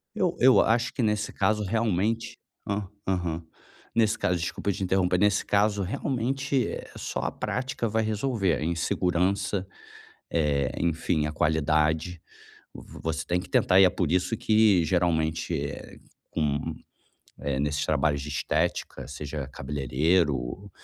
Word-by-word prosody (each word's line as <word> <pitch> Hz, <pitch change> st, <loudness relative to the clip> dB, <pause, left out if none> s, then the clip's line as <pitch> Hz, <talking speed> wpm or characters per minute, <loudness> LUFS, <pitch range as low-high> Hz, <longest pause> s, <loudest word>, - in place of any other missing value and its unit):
Eu -, -, +1 dB
eu 130 Hz, +1 st, +7 dB
acho 120 Hz, +2 st, +1 dB
que 130 Hz, -, -2 dB
nesse 105 Hz, -1 st, 0 dB
caso, 105 Hz, -1 st, +1 dB
realmente 110 Hz, +1 st, 0 dB, 0.3 s
hã, 100 Hz, -1 st, -2 dB, 0.2 s
aham. 90 Hz, -3 st, -1 dB, 0.5 s
Nesse 110 Hz, -2 st, +3 dB
caso 90 Hz, -1 st, 0 dB
desculpa 85 Hz, +4 st, -2 dB
te 95 Hz, -, -4 dB
interromper. 90 Hz, -1 st, +2 dB
Nesse 105 Hz, 0 st, +2 dB
caso 105 Hz, 0 st, +2 dB
realmente, 130 Hz, +5 st, -1 dB
eh, -, -, -6 dB
só -, -, -4 dB
a -, -, -1 dB
prática 125 Hz, -2 st, -2 dB
vai 110 Hz, +1 st, +1 dB
resolver 110 Hz, -4 st, 0 dB
a -, -, -4 dB
insegurança, 90 Hz, +3 st, 0 dB, 0.6 s
eh, 75 Hz, -4 st, +1 dB
enfim, 80 Hz, -2 st, 0 dB
a -, -, -3 dB
qualidade. 80 Hz, +2 st, +1 dB, 0.6 s
V -, -, -11 dB
você 80 Hz, 0 st, -2 dB
tem 90 Hz, +2 st, 0 dB
que -, -, -9 dB
tentar 95 Hz, -, +4 dB
e 95 Hz, -, +9 dB
é -, -, +5 dB
por 90 Hz, -3 st, -1 dB
isso 90 Hz, +5 st, +1 dB
que, 105 Hz, -5 st, +4 dB
geralmente, 80 Hz, -1 st, 0 dB
eh, 70 Hz, 0 st, -5 dB, 0.3 s
com 75 Hz, +1 st, -1 dB, 0.7 s
eh, 70 Hz, -1 st, -1 dB
nesses 75 Hz, +1 st, 0 dB
trabalhos 75 Hz, -2 st, +1 dB
de 75 Hz, -, -7 dB
estética, 70 Hz, -4 st, -1 dB
seja 75 Hz, -1 st, -5 dB
cabeleireiro, 70 Hz, +4 st, 0 dB
90 Hz, 140 wpm, -27 LUFS, 80-105 Hz, 0.7 s, e